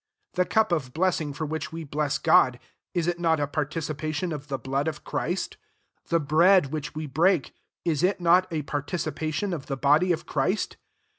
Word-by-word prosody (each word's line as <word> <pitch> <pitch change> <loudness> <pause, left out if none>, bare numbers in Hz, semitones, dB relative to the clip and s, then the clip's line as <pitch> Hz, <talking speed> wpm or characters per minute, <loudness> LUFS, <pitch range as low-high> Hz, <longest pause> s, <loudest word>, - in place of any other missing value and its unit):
16 180 - +2
The - - -14
cup 220 -3 +3
of 135 -7 -1
blessing 165 -4 +1
for 155 +3 -4
which 155 +1 -4
we 165 0 -5
bless 150 0 -1
Gocf, 130 -2 +4 0.4
is 175 -2 +1
it 175 0 -1
not 165 -2 +2
a 145 - +1
partici 155 +2 -2
pation 155 +3 -3
of 150 -1 -7
the 135 -2 -2
blood 135 +4 -2
of 155 -1 -4
Christ? 175 +4 -2 0.5
The 170 - +3
bread 160 +1 +4
which 150 -1 -4
we 155 0 -3
break, 160 +3 +2 0.3
is 160 -4 +1
it 185 +2 +2
not 180 +2 +4
a 155 -2 -2
participation 155 +5 -2
of 150 -5 -5
the 135 - -3
body 150 +7 +4
of 165 - -1
Christ? 170 +9 -1
155 Hz, 195 wpm, -26 LUFS, 145-175 Hz, 0.5 s, Gocf